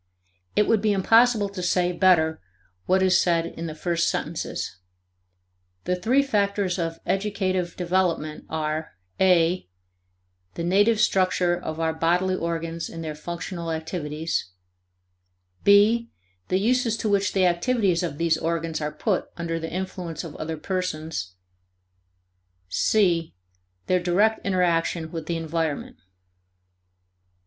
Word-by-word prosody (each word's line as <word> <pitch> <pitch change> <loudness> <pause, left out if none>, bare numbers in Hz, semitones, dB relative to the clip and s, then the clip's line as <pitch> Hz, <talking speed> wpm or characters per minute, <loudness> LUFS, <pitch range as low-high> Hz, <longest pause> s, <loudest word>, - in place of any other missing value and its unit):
It 210 - +3
would 225 -3 +3
be 210 -1 +2
impossible 225 +2 +4
to 195 -2 -6
say 180 0 +1
better 170 -3 +3 0.5
what 190 +1 +3
is 185 -1 +4
said 170 -2 +2
in 165 0 -6
the 155 - -6
first 170 +1 0
sentences. - - -4 1.1
The 180 - 0
three 240 +10 +2
factors 200 -6 0
of 165 -1 -2
educative 190 -3 -1
development 175 -4 -1
are 155 -5 -3 0.2
(a) 180 - +3 0.9
the 170 - -3
native 205 +5 +3
structure 185 -5 +2
of 160 -2 -6
our 160 0 0
bodily 175 +4 +1
organs 165 -1 -3
and 165 0 -7
their 155 -1 -4
functional 170 +2 -5
activities; 160 - -3 1.1
(b) 215 +4 +5 0.4
the 185 - +1
uses 235 +1 +1
to 220 - -2
which 200 -1 +1
the 190 -2 +3
activities 180 0 +2
of 165 -5 -3
these 165 -1 +1
organs 165 -1 -2
are 150 0 -2
put 200 +1 -1
under 165 -1 -2
the 160 0 -5
influence 180 -3 -4
of 160 -3 -8
other 160 +1 -4
persons; 160 - -3 1.3
(c) 170 - +2 0.5
their 185 - +2
direct 195 +5 +2
interaction 170 -3 0
with 165 -2 -6
the 170 - -1
environment. 160 -2 -3
175 Hz, 125 wpm, -25 LUFS, 165-195 Hz, 1.3 s, b